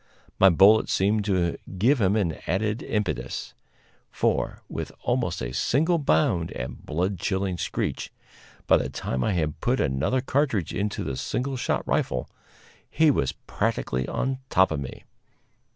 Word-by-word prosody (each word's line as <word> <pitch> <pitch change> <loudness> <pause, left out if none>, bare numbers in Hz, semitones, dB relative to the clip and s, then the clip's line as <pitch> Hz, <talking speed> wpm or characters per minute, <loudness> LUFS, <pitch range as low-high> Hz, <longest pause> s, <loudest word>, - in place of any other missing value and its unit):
My 95 - +8
bullet 100 +5 +6
seemed 105 +2 +2
to 90 -4 +1 0.2
give 120 +6 +3
him 100 +1 +3
an 90 -7 0
added 105 +5 0
impetus; 90 - -3 0.6
for, - - -1
with - - -5
almost - - 0
a - - -4
single 160 - +2
bound 115 - +2
and 60 0 -5
a - - -15
blood 90 +4 -1
chilling 95 -1 -1
screech, - - -3 0.5
by - - +5
the 65 - -2
time 65 -1 -3
I 105 - +1
had 80 -3 -2
put 125 +2 +1
another 70 - +1
cartridge 130 - 0
into 100 +1 -2
my 70 - -2
single 130 - -2
shot 125 - -1
rifle, - - 0 0.6
he 155 0 +4
was 70 - 0
practically 65 0 -1
on 130 0 -2
top 95 -1 +4
of 80 - -1
me. 70 - -7
95 Hz, 150 wpm, -25 LUFS, 80-120 Hz, 0.6 s, My